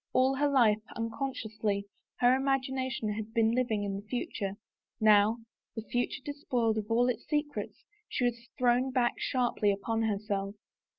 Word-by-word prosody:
All 260 +1 +4
her 290 +1 +3
life, 225 -6 +4
unconsciously, 220 -4 -2 0.4
her 245 +1 +6
imagination 265 -3 -1
had 220 +2 -6
been 225 -1 +4
living 235 -4 0
in 200 -1 -2
the 200 +1 -10
future, 210 -4 -3 0.5
now, 215 +1 +5 0.4
the 225 - -4
future 245 +3 -2
despoiled 245 -6 0
of 210 - -5 0.2
its 250 - -2
secrets, 295 -1 -3 0.2
she 250 - 0
was 235 -1 -2
thrown 250 +1 +3
back 250 -2 +1
sharply 240 -5 +1
upon 225 +3 -1
herself. 200 -2 -1
235 Hz, 140 wpm, -30 LUFS, 215-255 Hz, 0.5 s, her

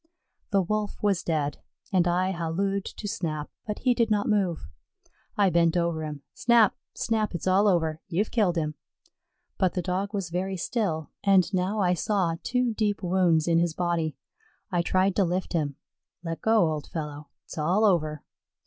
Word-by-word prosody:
The 195 -2 +3
Wolf 210 +3 -2
was 200 -3 +2
dead, 150 -3 -1 0.3
and 180 -2 +4
I 180 +2 +1
hallooed 190 +3 -1
to 210 - -6
Snap, 155 -6 -3 0.2
but 210 - -2
he 250 -1 +2
did 230 -2 +1
not 210 -1 +1
move. 190 - 0 0.7
I 200 -3 +4
bent 170 0 +3
over 170 -2 0
him. 150 -2 -6
"Snap 235 -3 +4 0.2
Snap, 215 -4 -1
it's 170 - -4
all 190 +3 +4
over; 160 -4 +1
you've 195 +4 -1
killed 205 -7 +2
him." 155 -2 -1 0.9
But 185 -2 +2
the 180 - -1
Dog 190 +2 -2
was 195 -5 -3
very 190 +2 -2
still, 170 -5 -2
and 195 -1 +4
now 190 +3 0
I 180 -2 +3
saw 180 -2 0
two 250 -2 0
deep 210 -2 -1
wounds 175 -3 +2
in 165 -1 +4
his 170 -2 0
body. 170 -5 -1 0.5
I 175 -2 +2
tried 185 +2 +1
to 200 - +5
lift 180 +2 -2
him. 150 -4 -1 0.5
"Let 165 -1 -4
go, 220 -7 +3
old 150 -2 -4
fellow; 150 -2 -6 0.2
it's - - -8
all 180 +8 +2
over." 155 -6 +1
180 Hz, 175 wpm, -27 LUFS, 165-200 Hz, 0.9 s, to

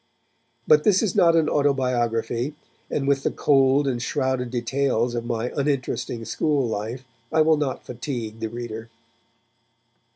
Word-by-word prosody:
But 460 - +6
this 205 -3 +4
is 205 - -1
not 170 -1 +5
an 160 -2 +3
autobiography, 125 -2 0 0.3
and 140 -2 -1
with 140 -1 +2
the - - 0
cold 140 0 +3
and 125 -3 -1
shrouded 130 0 -1
details 120 0 0
of 120 -1 -3
my 120 0 -2
uninteresting 135 -4 -2
school 145 -2 0
life 115 +4 -4 0.3
I 160 - +3
will 160 0 +5
not 145 -3 -3
fatigue 120 -3 -5
the 110 - -3
reader. 115 -1 -7
130 Hz, 140 wpm, -24 LUFS, 120-145 Hz, 0.3 s, But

